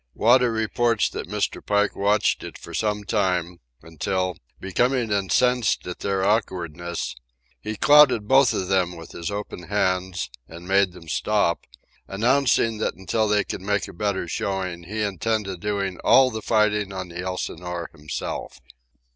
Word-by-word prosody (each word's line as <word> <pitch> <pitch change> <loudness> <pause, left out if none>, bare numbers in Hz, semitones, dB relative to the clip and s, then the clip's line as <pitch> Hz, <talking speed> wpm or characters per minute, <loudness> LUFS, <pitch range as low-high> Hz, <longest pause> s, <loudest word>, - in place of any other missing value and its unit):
Wada 125 +2 +4
reports 115 0 +1
that - - -6
Mr. - - -2
Pike 105 0 +1
watched 100 +1 +2
it - - -8
for 85 - -11
some 105 +3 -1
time, 90 -5 0 0.2
until, 90 +3 -2 0.2
becoming 120 +4 0
incensed 110 +5 +2
at 90 - -6
their 95 -1 0
awkwardness, 85 -5 -2 0.5
he 110 +10 -4
clouted 145 -6 +6
both 135 0 +5
of 95 - -2
them 90 -2 +1
with 80 -1 -11
his 85 +2 -5
open 100 -3 -6
hands 95 -6 -1 0.2
and 85 +2 -11
made 95 -1 +3
them 85 -2 -13
stop, 95 +2 0 0.4
announcing 115 +1 +2
that - - -1
until 110 +4 0
they 105 -1 +2
could - - -6
make 100 +1 -1
a - - -10
better 100 -1 -2
showing 90 -1 -3
he 105 +4 -3
intended 100 -1 -2
doing 100 -2 -2
all 130 -1 +5
the 110 -1 -5
fighting 105 -3 +1
on 95 -1 -5
the 85 +1 -8
Elsinore 90 -1 -4
himself. 75 -1 -5
100 Hz, 150 wpm, -24 LUFS, 90-110 Hz, 0.5 s, clouted